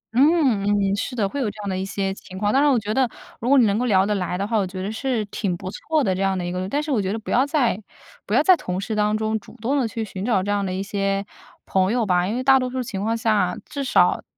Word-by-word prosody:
嗯 275 -5 +4
嗯， 200 -1 +1
是 250 +5 -3
的， 210 -5 +1
会 280 - -5
有 230 - 0
这 205 - -11
样 - - -4
的 - - -2
一 190 - -2
些 195 0 -2
情 185 -1 -11
况。 205 +1 0
当 270 - +4
然 290 0 +4
我 260 - +3
觉 215 -1 -2
得 260 0 +2 0.3
如 235 - -2
果 280 - +6
你 250 - +6
能 205 0 +1
够 250 - 0
聊 195 -5 +3
得 210 - 0
来 180 -3 -2
的 195 - -1
话， 225 0 0
我 200 -3 +1
觉 185 +1 -7
得 200 - -3
是 230 -1 -1
挺 195 -3 -3
不 185 - -6
错 310 +6 -1
的 190 - +1
这 185 - -3
样 195 -1 +1
的 180 - -3
一 175 - -3
个 185 +1 -3
但 290 +7 -1
是 300 - -4
我 235 -6 +2
觉 190 0 -2
得 220 - -2
不 220 - -7
要 255 - +4
在 255 - +1 0.5
不 - - 0
要 - - +4
在 370 - +7
同 185 - -4
事 205 +3 -3
当 210 0 +1
中 220 0 -1
主 210 - -16
动 240 +6 0
地 250 - +1
去 225 -1 -4
寻 190 -2 -7
找 210 -4 +1
这 205 - -2
样 205 -1 0
的 190 - -2
一 190 +1 -2
些 195 0 -1 0.4
朋 190 0 +1
友 240 -1 +1
吧， 180 -2 +2
因 215 - -2
为 255 - -2
大 265 0 +6
多 255 -1 -2
数 255 0 -3
情 195 -5 -5
况 225 +2 0
下 215 -5 +1
至 280 - -5
少 260 - +3
210 Hz, 335 characters per minute, -22 LUFS, 195-250 Hz, 0.5 s, 在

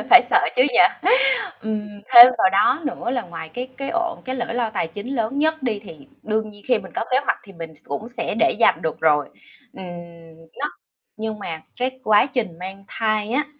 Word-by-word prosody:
phải - - +10
sợ - - +6 0.2
chứ - - +6
nhỉ. - - +3 0.8
Ừm, 215 -1 -3 0.3
thêm 240 0 +12
vào 190 - +4
đó 210 - +2
nữa 270 - -3
là 245 -1 -1
ngoài 165 -4 -9
cái 250 +1 -5
cái 275 0 -4
ổn 345 -1 -2
cái 260 0 -3
lỗi 240 -2 -4
lo 235 -2 -1
tài 185 -6 -2
chính 205 +11 -6
lớn 230 +5 -1
nhất 315 -1 0
đi, 225 -5 -1
thì 155 -7 -13 0.2
đương 215 0 -1
nhiên 205 -1 -17
khi 250 -2 +3
mình - - -10
có - - -2
kế 255 - +4
hoạch, - - +1
thì 195 - -14
mình 165 -2 -9
cũng 145 +11 -5
sẽ 230 - -2
để - - +4
dành 230 - +4
được 160 - -3
rồi. 150 -2 +2 0.4
Ừm, 190 - -9 0.7
nó 290 - -1 0.5
nhưng 220 -1 -4
mà, 165 -5 -6 0.2
cái 260 +1 -2
quá 215 +2 +5
trình 185 -10 -3
mang 190 +2 -8
thai 215 -1 -1
á, 280 +4 +1
220 Hz, 210 wpm, -21 LUFS, 190-250 Hz, 0.8 s, thêm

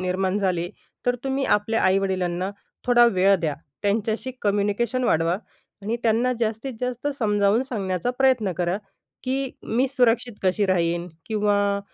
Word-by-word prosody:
निर्माण 185 +1 0
झाली, 180 -3 0 0.4
तर 245 - +3
तुम्ही 270 0 0
आपल्या 220 +1 +1
आई-वडिलांना 185 -1 +1 0.4
थोडा 240 -1 +6
वेळ 195 -2 +4
द्या. 155 -3 -1 0.3
त्यांच्याशी 220 +4 0
कम्युनिकेशन 210 +5 +1
वाढवा 165 -2 +2 0.5
आणि 220 +4 -1
त्यांना 235 +2 +2
जास्तीत 225 +4 -2
जास्त 250 +1 -3
समजावून 210 +1 +2
सांगण्याचा 200 -4 -2
प्रयत्न 255 -7 +3
करा 175 +1 +1 0.5
की 265 +1 -1
मी 250 +4 +1
सुरक्षित 245 -2 +2
कशी 195 +2 +2
राहीन 175 -1 0 0.2
किंवा 205 -2 +1
205 Hz, 130 wpm, -24 LUFS, 185-240 Hz, 0.5 s, थोडा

